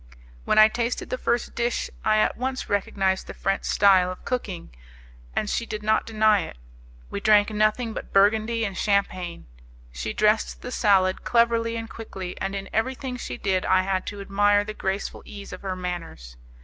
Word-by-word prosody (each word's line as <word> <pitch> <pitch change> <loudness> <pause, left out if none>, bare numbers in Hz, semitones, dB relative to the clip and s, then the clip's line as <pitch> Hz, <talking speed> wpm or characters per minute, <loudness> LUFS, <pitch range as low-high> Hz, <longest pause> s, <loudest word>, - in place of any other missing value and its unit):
When - - +1
I 215 0 +9
tasted 235 +2 -3
the 255 - -1
first 240 0 -1
dish 235 0 -1 0.2
I 215 0 +3
at 215 - +2
once 260 +1 -3
recognized 195 -1 0
the - - -8
French 195 0 -1
style 190 -3 +4
of 185 - -10
cooking, 195 - -4 0.6
and 215 - 0
she 230 +2 -2
did 215 -1 -5
not 215 +1 +1
deny 215 -2 +3
it. - - -6 0.5
We - - -3
drank 210 0 +4
nothing 215 +2 +1
but - - -7
Burgundy 220 +3 +3
and 195 -2 -4
Champagne. 185 -4 -1 0.5
She - - -4
dressed 215 +1 +1
the 250 - -6
salad 190 -5 +2
cleverly 230 -1 +2
and 225 0 -4
quickly, 190 -6 -7
and 195 +1 -2
in 195 0 -5
everything 255 +3 -1
she - - -6
did 190 -2 0
I 185 0 +3
had 190 -1 -1
to 205 - -5
admire 205 +1 +3
the 215 +1 -6
graceful 195 -1 -3
ease 200 -2 -10
of 185 - -8
her 190 -2 -3
manners. 170 - -6
205 Hz, 180 wpm, -25 LUFS, 190-225 Hz, 0.6 s, I